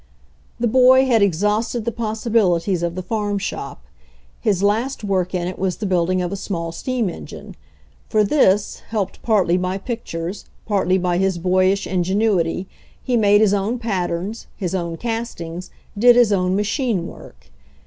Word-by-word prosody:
The 240 - +1
boy 260 +2 +6
had 235 -4 +3
exhausted 210 +5 +1
the 235 - 0
possibilities 215 -6 0
of 170 0 -2
the 185 - -4
farm 205 +1 -2
shop. 195 - -5 0.6
His 200 -3 0
last 225 +5 0
work 185 -2 -1
in 175 -1 -1
it 185 - -6
was 185 -2 -1
the 215 - -4
building 185 -1 +1
of 175 - -3
a - - -2
small 170 -4 -4
steam 245 +5 -2
engine. 175 - -8 0.5
For 215 -2 +3
this, 205 -4 +2
helped 205 -4 -3
partly 190 -6 +2
by 185 +1 -1
pictures, 195 -4 -5 0.2
partly 190 -3 +1
by 180 -1 0
his 190 -2 +1
boyish 185 +3 +2
ingenuity, 185 -1 0 0.4
he 250 - 0
made 205 -2 +4
his 210 -2 +4
own 205 +5 0
patterns, 195 -2 -3
his 185 -3 -3
own 170 -3 -2
castings, 205 -7 -5 0.3
did 240 +4 +6
his 240 -4 +5
own 185 -1 +1
machine 210 - 0
work. 65 - -13
195 Hz, 160 wpm, -20 LUFS, 180-225 Hz, 0.6 s, boy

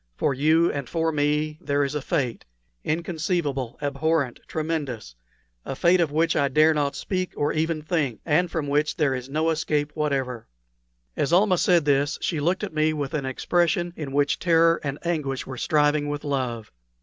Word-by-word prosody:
For - - +1
you 155 +5 +3
and 140 -4 -5
for 165 -1 0
me 150 +1 0
there 145 0 +1
is 140 +1 -2
a 150 - -2
fate 135 -6 -2 0.4
inconceivable, 160 - -2
abhorrent, 145 -1 0
tremendous! 150 - -3 0.5
a - - -5
fate 175 +6 +3
of 165 -4 +1
which 160 +2 +1
I 140 - +3
dare 155 +3 +4
not 145 -2 -1
speak 185 -2 -3
or 145 - 0
even 155 0 -1
think, 150 -7 -1
and 170 +3 +2
from 160 -3 -2
which 150 +2 0
there 145 -4 +2
is 130 0 -5
no 155 +3 +1
escape 150 -2 -1
whatever." 135 -6 -2 0.7
As 145 - 0
Almah 185 0 +4
said 175 -4 +3
this 145 0 +2
she 160 - -1
looked 175 +7 0
at 200 - -4
me 155 0 +2
with 145 -3 -4
an 140 -3 -2
expression 175 +5 0
in 150 -4 -6
which 145 +1 +1
terror 165 -1 +3
and 140 -1 -3
anguish 150 -6 -2
were 130 - -7
striving 145 +2 +1
with 145 0 -4
love. 125 -6 -3
150 Hz, 180 wpm, -24 LUFS, 140-165 Hz, 0.7 s, dare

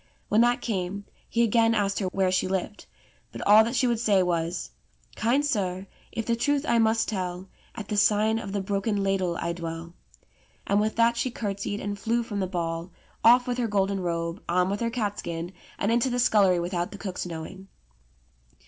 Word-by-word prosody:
When 215 +2 +4
that 240 +1 +3
came, 200 -2 -3 0.2
he 235 - +2
again 230 0 +3
asked 200 -2 0
her 195 - -1
where 185 0 +1
she 185 0 +1
lived. 190 +2 -3 0.4
But - - -7
all 210 +2 +8
that 235 +3 -2
she 255 - +2
would 235 -2 +1
say 205 -5 +3
was: 170 0 -2 0.4
"Kind 255 +6 +1
sir, 190 -8 -1 0.3
if 225 - -4
the 235 - +1
truth 285 +4 0
I 235 - +3
must 225 0 +2
tell, 185 -2 -4 0.3
At 215 -4 -7
the 210 - -1
sign 215 +2 +3
of 200 - -6
the 200 0 -1
'Broken 200 +1 -1
Ladle' 190 -3 0
I 170 - -2
dwell"; 165 0 -6 0.7
and 200 +1 +2
with 215 +1 -1
that 235 +1 +3
she 255 - 0
curtsied 205 -3 -4
and 205 0 -4
flew 235 +3 0
from 210 -4 -4
the 190 - 0
ball, 170 -1 -3 0.3
off 245 +2 +7
with 250 -1 -2
her 240 - +1
golden 200 -1 0
robe, 170 0 -3
on 180 +2 +2
with 200 - -2
her 235 - 0
catskin, 200 -7 -3 0.3
and 205 - 0
into 235 +2 +2
the 245 - -1
scullery 200 -7 +4
with 175 +2 -3
out 175 0 -1
the 205 - -8
cook's 190 -3 -5
knowing. 175 +3 -8
200 Hz, 200 wpm, -26 LUFS, 180-230 Hz, 0.7 s, all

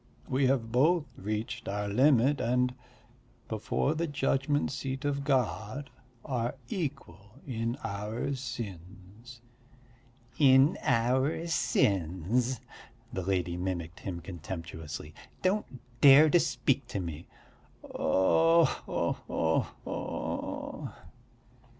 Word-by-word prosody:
We 130 +1 +2
have 120 -4 0
both 150 +6 +3
reached 105 +3 -4
our 105 +1 -2
limit 130 +5 +4
and, 125 +1 +1 0.7
before 110 +6 0
the 165 +2 -1
judgment 145 0 0
seat 135 0 -4
of 140 -1 0
God, 130 -1 -1 0.3
are 120 -1 -2
equal 110 - -5
in 115 -1 -2
our 105 +7 -3
sins." 115 -1 -8 1.0
"In 135 +2 +6
our 130 +7 +1
sins," 110 - +1 0.5
the 95 - -2
lady 90 -2 -1
mimicked 90 -2 -4
him 85 -3 -5
contemptuously. 80 -3 -7 0.3
"Don't 195 +3 +1 0.3
dare 145 +2 +8
to 175 - +6
speak 140 -5 0
to 120 -5 -3
me." 85 -2 -6 0.6
"Oh 165 - +3
ho - - -2 0.2
ho 80 0 +1 0.2
ho!" - - -4
120 Hz, 100 wpm, -30 LUFS, 95-140 Hz, 1.0 s, dare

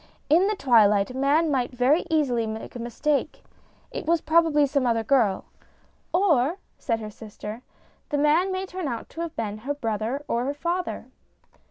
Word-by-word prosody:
In 345 +6 +5
the 425 - 0
twilight 215 - +4
a - - -9
man 290 +4 +2
might 255 -3 0
very 255 +7 +2
easily 260 -8 +1
make 220 +2 -7
a - - -5
mistake 275 +6 -2 0.5
it - - -6
was 335 0 +3
probably 315 -2 +3
some 275 -2 0
other 230 -1 +1
girl." 220 -6 +2 0.3
" - - -38
Or," 335 -4 +2 0.2
said 230 -4 -1
her 215 -1 -6
sister, 215 +1 -9 0.2
" - - -36
the 290 - 0
man 310 +6 +3
may 375 0 -2
turn 370 -3 -5
out 235 -4 -5
to 330 - -7
have 335 -2 -5
been 215 -2 -4
her 280 +6 -3
brother 230 +2 -3
or 235 +1 0
her 280 +2 -2
father." 345 +4 -3
275 Hz, 185 wpm, -25 LUFS, 230-320 Hz, 0.5 s, In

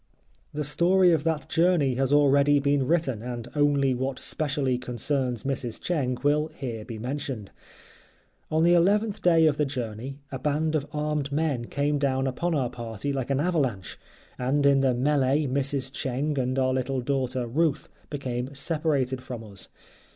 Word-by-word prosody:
The 150 0 -3
story 175 +5 +4
of 160 -3 +2
that 160 -2 -1
journey 165 -6 +2
has 135 +1 0
already 145 0 +5
been 140 -1 +1
written, 155 -9 +1
and 120 -1 -5
only 145 -2 +3
what 130 +1 -2
specially 140 -4 -1
concerns 125 -1 -2
Mrs. 135 -4 -3
Cheng 130 -8 -1
will 150 +2 +2
here 120 -8 -5
be 115 +1 -7
mentioned. 125 -3 -4 1.0
On 160 +1 +2
the 175 +1 +5
eleventh 205 +4 +2
day 165 -3 +5
of 150 -2 +3
the 150 - +2
journey 125 0 -5
a 135 - -4
band 155 +2 0
of 150 -2 -1
armed 150 -1 -2
men 145 -5 0
came 145 +3 0
down 135 -1 +1
upon 160 +6 -1
our 130 -4 0
party 120 +3 -4
like 135 -2 -3
an 135 -1 +1
avalanche, 140 - -1 0.4
and 140 +3 +1
in 140 -1 +5
the 130 -2 +2
melee 140 +2 +2
Mrs. 135 0 -1
Cheng 140 +3 -1
and 130 +1 -1
our 130 -1 +2
little 130 0 -1
daughter, 130 -1 -1
Ruth, 150 +5 0 0.2
became 130 -2 -4
separated 140 -4 -1
from 120 -3 -7
us. 100 -3 -8
140 Hz, 165 wpm, -26 LUFS, 125-150 Hz, 1.0 s, already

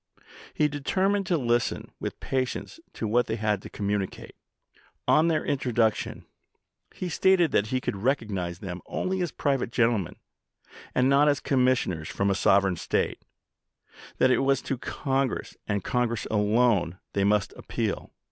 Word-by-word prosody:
" - - -18
He 150 - +5
deter 150 +6 0
mined 200 -1 0
to 175 -4 +2
listen 120 -3 0
with - - -5
patience 130 - -3
to 110 - -3
what 120 +3 +2
they 110 - -1
had 105 -3 0
to - - -9
communicate... 100 -2 -3 0.7
On 155 +2 +5
their 160 -2 +1
introduction 120 -5 0 0.7
he 185 - -5
stated 180 -1 +3
that 105 - +2
he 130 +3 0
could 100 - -3
recognize 100 -7 -1
them 90 -2 -6
only 190 0 -2
as 175 -4 -1
private 135 -4 -1
gentle 120 -2 +3
men, 90 - -6 0.8
and 125 0 +4
not 140 +2 +5
as 145 -1 +3
commissioners 125 - +1
from 100 0 0
a - - +3
sovereign 95 -1 +3
State; - - -1 1.0
that 130 - +4
it - - +3
was 135 -1 +2
to 135 - -2
Congress, 135 -2 -2
and 100 -3 -1
Congress 120 -2 0
alone, 105 -4 +2 0.2
they 100 - +1
must 105 0 +2
appeal. - - -3
120 Hz, 155 wpm, -27 LUFS, 100-140 Hz, 1.0 s, He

